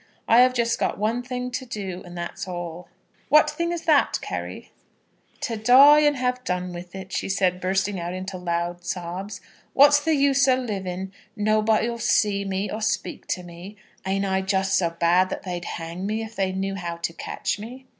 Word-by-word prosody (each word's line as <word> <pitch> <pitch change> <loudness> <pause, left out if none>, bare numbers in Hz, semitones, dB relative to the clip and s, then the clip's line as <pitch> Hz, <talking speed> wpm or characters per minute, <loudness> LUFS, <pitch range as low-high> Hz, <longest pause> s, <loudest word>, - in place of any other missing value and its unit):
I 230 - +6
have 255 0 +5
just 235 0 +1
got - - 0
one 220 +4 0
thing 250 0 -4
to 260 - -3
do, 195 -7 -6
and 175 -1 -10
that's 170 +1 -5
all." 175 -1 -6 0.4
"What 300 +2 +6
thing 340 0 -2
is 345 -1 -4
that, 305 -4 +3
Carry?" - - -6 0.7
"To 230 - -2
die 260 +7 +7
and 295 -1 +3
have 250 0 -1
done 180 -2 -2
with 175 +1 -9
it," 190 -1 -8
she - - -2
said, 185 -2 +1
bursting 190 +1 0
out 170 +1 -4
into 185 +1 -5
loud 175 0 -2
sobs. 180 +3 -5 0.3
"What's 290 +1 +6
the 320 0 +2
use 275 -1 +3
o' 260 - +5
living? 190 -6 -4 0.2
Nobody 215 +1 +2
'll 235 0 -4
see 210 -3 +2
me, 195 +1 -2
or 215 - -4
speak 215 - -2
to 180 - -2
me. 175 +4 -10 0.3
Ain't 195 +1 -1
I 190 0 0
just 190 0 0
so 175 -3 +2
bad 170 +2 +2
that - - -5
they'd 175 -2 -5
hang 170 +3 -5
me 220 +2 -2
if 220 0 -9
they 190 -2 0
knew 195 +1 -2
how 175 -3 -4
to 170 0 -3
catch 205 - -3
me?" 250 +5 -9
195 Hz, 195 wpm, -24 LUFS, 180-240 Hz, 0.7 s, die